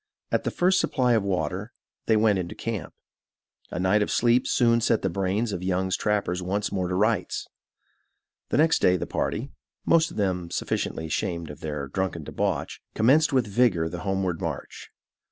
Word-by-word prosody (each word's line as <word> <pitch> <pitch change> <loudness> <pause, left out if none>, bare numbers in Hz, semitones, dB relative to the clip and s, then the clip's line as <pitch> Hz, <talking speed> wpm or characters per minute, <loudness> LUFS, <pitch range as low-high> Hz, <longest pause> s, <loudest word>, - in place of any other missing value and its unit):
At - - 0
the - - +1
first 185 +1 +2
supply 125 -4 +2
of 110 - +3
water, 95 +2 -2 0.3
they 110 - +4
went 105 -3 +3
into 85 -1 -5
camp. 115 -4 -5 0.7
A - - -5
night 95 +3 +3
of 105 - 0
sleep 120 +1 +3
soon 115 -1 +3
set 115 0 +2
the 95 - 0
brains 100 +5 -1
of 90 - -4
Young's 95 0 0
trappers 100 -4 0
once 100 +3 -2
more 95 -2 -1
to 90 - -2
rights. 105 -1 0 1.0
The - - +1
next 160 +2 +4
day 90 0 +4
the - - -3
party, 120 +7 -2 0.3
most 165 0 +4
of - - -11
them 90 -4 -1
sufficiently 80 -1 -2
ashamed 80 0 -2
of 75 - -11
their 75 -3 -4
drunken 90 +1 -3
debauch, - - -2
commenced 140 +8 +4
with 130 -4 +2
vigor 100 -6 +2
the 85 +1 -6
homeward 95 -3 -1
march. - - -5
100 Hz, 175 wpm, -26 LUFS, 90-115 Hz, 1.0 s, they